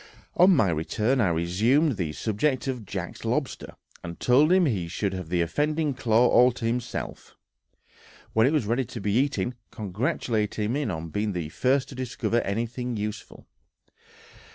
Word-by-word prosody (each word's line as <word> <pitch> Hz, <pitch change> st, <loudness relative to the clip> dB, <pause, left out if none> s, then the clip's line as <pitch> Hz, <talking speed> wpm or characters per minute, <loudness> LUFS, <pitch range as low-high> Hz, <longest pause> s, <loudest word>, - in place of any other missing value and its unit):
On 180 Hz, +2 st, +6 dB
my 110 Hz, -, +3 dB
return, 110 Hz, -, 0 dB
I 105 Hz, -, +3 dB
resumed 105 Hz, -, +2 dB
the 85 Hz, -6 st, -2 dB
subject 115 Hz, -, -1 dB
of 125 Hz, -6 st, -4 dB
Jack's -, -, -6 dB
lobster, -, -, -3 dB, 0.3 s
and 85 Hz, -1 st, -7 dB
told 140 Hz, +6 st, +4 dB
him 185 Hz, -1 st, +5 dB
he 100 Hz, -, -1 dB
should 95 Hz, +3 st, -2 dB
have 90 Hz, -3 st, -6 dB
the 90 Hz, 0 st, +1 dB
offending 150 Hz, -, 0 dB
claw 115 Hz, 0 st, +3 dB
all 125 Hz, +1 st, +5 dB
to 120 Hz, -, -6 dB
himself, 120 Hz, +1 st, -4 dB, 1.0 s
when 110 Hz, +2 st, +4 dB
it -, -, +2 dB
was 150 Hz, -8 st, +1 dB
ready 120 Hz, +5 st, +1 dB
to 120 Hz, -1 st, -8 dB
be 100 Hz, 0 st, -1 dB
eaten, 130 Hz, 0 st, +1 dB, 0.2 s
congratulating 110 Hz, -, -2 dB
him 145 Hz, -4 st, -1 dB
on 80 Hz, -2 st, -4 dB
being 105 Hz, +4 st, -2 dB
the 85 Hz, -4 st, -4 dB
first 130 Hz, -, +1 dB
to -, -, -9 dB
discover 125 Hz, -2 st, -1 dB
anything 120 Hz, +4 st, -3 dB
useful. 105 Hz, +1 st, -6 dB
115 Hz, 160 wpm, -26 LUFS, 100-130 Hz, 1.0 s, On